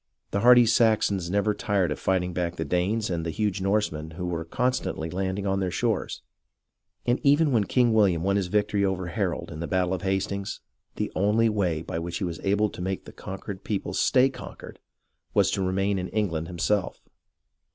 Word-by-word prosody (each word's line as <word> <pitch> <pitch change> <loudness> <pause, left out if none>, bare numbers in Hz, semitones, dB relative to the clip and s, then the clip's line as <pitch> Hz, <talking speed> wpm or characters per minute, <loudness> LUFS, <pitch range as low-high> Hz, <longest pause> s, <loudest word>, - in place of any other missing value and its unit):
The 100 - 0
hardy 120 +2 +7
Saxons 110 -6 +2
never 100 +2 +1
tired 100 -5 0
of - - -3
fighting 90 -1 0
back 85 0 -2
the - - -3
Danes 95 +4 0
and 85 -1 -1
the 85 - -3
huge 100 +2 -1
Norsemen 95 -6 0
who 90 - -3
were 85 -2 -2
constantly 85 -4 -1
landing 95 +2 -2
on 95 0 +1
their 95 -1 0
shores, 110 +2 -2 0.8
and 120 +1 +2
even 145 +2 +4
when 110 -5 +2
King 120 +1 +3
WilHam 100 -7 +3
won 100 +3 +1
his 100 -3 0
victory 105 +1 +1
over 95 -2 0
Harold 85 - -2
in 75 - -7
the 85 - -3
battle 95 -1 +1
of 90 - -3
Hastings, 95 +1 -2 0.4
the - - -2
only 105 +4 +3
way 90 -7 0
by 80 - -4
which 85 0 -4
he - - -4
was 85 -3 -3
able 100 +2 +1
to - - -8
make 95 +1 -3
the - - -11
conquered 95 0 -7
people 100 -3 -3
stay 130 0 +4
conquered 135 - -10 0.6
was - - +4
to - - -1
remain 95 +1 0
in 90 - -3
England 85 -7 -1
himself. 90 +4 -1
95 Hz, 195 wpm, -26 LUFS, 90-105 Hz, 0.8 s, hardy